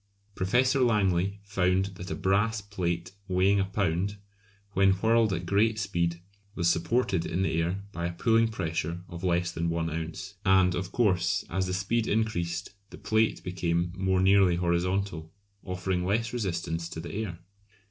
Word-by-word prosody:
Professor 125 +9 +2
Langley 100 -5 +2
found 95 -1 +1
that 90 0 -8
a - - -2
brass 105 +4 +1
plate 90 -4 -3 0.2
weighing 95 +2 +3
a 95 - +2
pound, 95 0 -1 0.6
when 95 0 +4
whirled 110 +2 +3
at 90 -1 -2
great 105 +5 +2
speed, 85 -4 -1 0.4
was 85 -2 +1
supported 90 +2 +1
in 90 +3 -1
the 85 -3 +1
air 90 +4 -2
by 85 -3 -3
a - - -3
pulling 115 +5 +3
pressure 85 -4 -3
of 85 0 -8
less 90 -1 +1
than 85 0 -2
one 85 -1 -1
ounce. 85 +4 -5
And, 95 -2 +4
of 90 +2 -3
course, 95 -6 +1
as 95 -1 0
the 90 - -2
speed 110 +5 0
increased 95 -6 -1 0.2
the - - -11
plate 110 +1 +1
became 85 -1 -1
more 95 0 +1
nearly 95 -2 +5
horizontal, 85 -1 -1 0.3
offering 90 -1 -2
less 115 +5 0
resistance 85 -7 -2
to 80 - -6
the 85 - -7
air. 100 -5 -4
95 Hz, 160 wpm, -28 LUFS, 85-100 Hz, 0.6 s, nearly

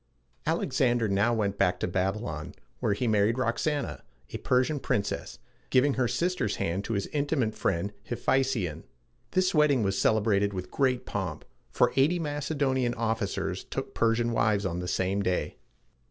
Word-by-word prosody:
Alexander 120 -4 +1
now 100 +4 +2
went 100 -3 -1
back 90 -2 +2
to - - -1
Babylon, 90 -3 -2 0.2
where - - +1
he 120 +4 -1
married 105 +1 +3
Rox 120 +3 0
an´a, 145 -2 -3 0.3
a - - -4
Persian 130 +4 +1
princess, 115 -7 -2 0.3
giving 135 +2 +4
her 125 -2 +1
sister's 175 - 0
hand 90 +4 -2
to 115 - -2
his 100 -2 -1
intimate 140 -6 0
friend 100 +2 -1 0.2
Hephæstion. 120 - 0 0.5
This 185 0 +2
wedding 150 -6 +4
was 95 -1 0
celebrated 100 -2 +2
with 90 -1 -5
great 130 -3 +1
pomp, 95 -7 -4 0.2
for - - +2
eighty 145 +7 +4
Macedonian 145 -5 -1
officers 110 -3 -2
took - - -5
Persian 115 +1 +2
wives 110 -3 +2
on 85 -1 -2
the 90 - -4
same 95 +2 0
day. 90 -2 -1
115 Hz, 155 wpm, -28 LUFS, 100-130 Hz, 0.5 s, giving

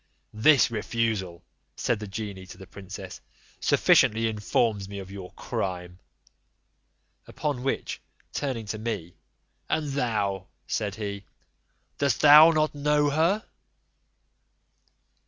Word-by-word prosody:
"This 130 +4 +4
refusal," 105 -6 -2 0.3
said 115 - -1
the 105 - -6
genie 100 -2 -6
to - - -11
the 95 - -11
princess, 95 +1 -9 0.4
"sufficiently 115 +1 +3
informs 105 -1 0
me 100 - -7
of 95 -1 -8
your 95 -2 -9
crime." 90 -1 -4 1.3
Upon 145 -4 -3
which, 135 +1 -3 0.3
turning 130 -6 -3
to 105 +1 -5
me, 105 -7 -4 0.6
"And 150 -2 0
thou," 105 -8 -1 0.2
said 100 -2 -2
he, 100 -2 -5 0.7
"dost 140 -2 +1
thou 150 +2 +9
not 155 -1 +1
know 145 0 +1
her?" 170 +9 +1
110 Hz, 110 wpm, -26 LUFS, 100-140 Hz, 1.3 s, thou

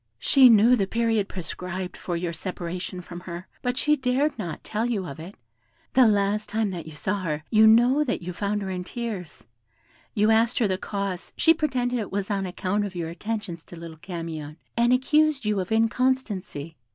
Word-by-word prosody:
She 260 - +6
knew 230 +2 +6
the 195 -5 0
period 225 -2 0
prescribed 180 +1 -5
for 175 -2 -3
your 170 0 -3
separation 180 +1 -5
from 175 0 -9
her, 175 0 -8
but 250 0 -1
she 300 +2 +4
dared 270 +2 +1
not 170 -7 -5
tell 220 +2 -1
you 210 -6 -1
of 140 -3 -8
it. 175 +5 -9 0.6
The 255 -2 +6
last 205 0 +1
time 220 -2 0
that 170 -3 -6
you 160 - -9
saw 195 +6 -2
her, 155 -3 -3
you 220 0 +7
know 240 +6 +5
that 240 -9 -2
you 180 +1 -5
found 205 +2 -2
her 190 - -4
in 180 -1 -3
tears; 180 - -6 0.7
you 210 +1 +4
asked 225 +2 +3
her 225 - +3
the 185 -1 -1
cause, 200 -3 -4
she 325 - +6
pretended 250 -6 -1
it 210 - -5
was 200 +1 -2
on 195 -2 -1
account 185 +3 -1
of 200 -2 -5
your 170 -2 -3
attentions 185 -1 -5
to - - -11
little 165 -1 -9
Camion, 160 -3 -6 0.2
and 235 +1 +3
accused 290 +1 +3
you 210 -1 +1
of 185 +1 -4
inconstancy. 220 - 0
200 Hz, 195 wpm, -25 LUFS, 180-235 Hz, 0.7 s, you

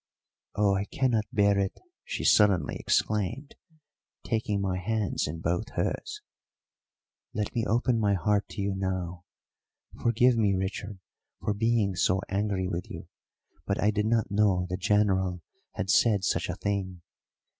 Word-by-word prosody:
"Oh, 100 -1 +3
I 100 +1 0
cannot 115 -2 0
bear 100 -1 +3
it!" 95 -1 -2 0.2
she - - -4
suddenly 100 -4 +4
exclaimed, 105 +7 -1 0.7
taking 110 -3 -1
my 95 -2 -1
hands 110 +1 -1
in 80 +2 -6
both 85 +2 -1
hers. - - -3 1.1
"Let 105 -1 -2
me 115 -2 -1
open 120 +2 +2
my 100 -2 +2
heart 100 +3 0
to - - -5
you 100 0 -1
now. 90 -2 -3 0.8
Forgive 120 +1 +3
me, 105 -3 +2
Richard, 95 +2 -4 0.4
for 105 - -1
being 110 -2 +1
so 90 +1 +2
angry 100 -2 -1
with 90 -1 -4
you, - - -9 0.6
but 100 - 0
I 105 - +3
did 105 0 0
not 115 -2 +1
know 100 -3 +2
the 90 - -2
General 95 -2 +1 0.3
had 95 +1 -1
said 105 -2 +4
such 85 -2 0
a 90 - -2
thing. 95 -3 -3
100 Hz, 145 wpm, -28 LUFS, 95-105 Hz, 1.1 s, suddenly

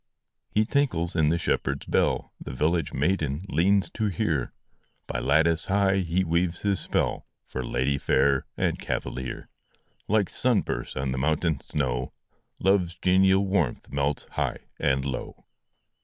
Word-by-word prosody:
He 110 +1 +2
tinkles 105 - 0
in 75 -2 +3
the 85 - +2
shepherd 70 -4 -1
s - - -16
bell - - 0
The - - -7
village 80 +3 0
maiden 75 +1 0
leans 100 +3 +3
to 110 - -1
hear 85 - -1 0.5
By - - -3
lattice 80 +5 +2
high 95 0 +3
he 90 0 +1
weaves 85 0 0
his 100 -2 +1
spell, - - -1 0.2
For 65 - -5
lady 65 +3 0
fair 65 0 +2
and - - 0
cavalier: 65 0 -4 0.6
Like 105 -2 +2
sun 120 -4 +2
bursts - - -4
on 65 0 -2
the 65 - -2
mountain 80 +1 +1
snow, 65 -4 -2 0.4
Love 95 -1 +3
s 85 - -11
genial 95 +1 +4
warmth 90 -9 -1
melts 70 0 -1
high - - -1 0.2
and 65 0 +1
low. 65 -2 -5
85 Hz, 150 wpm, -26 LUFS, 70-95 Hz, 0.6 s, genial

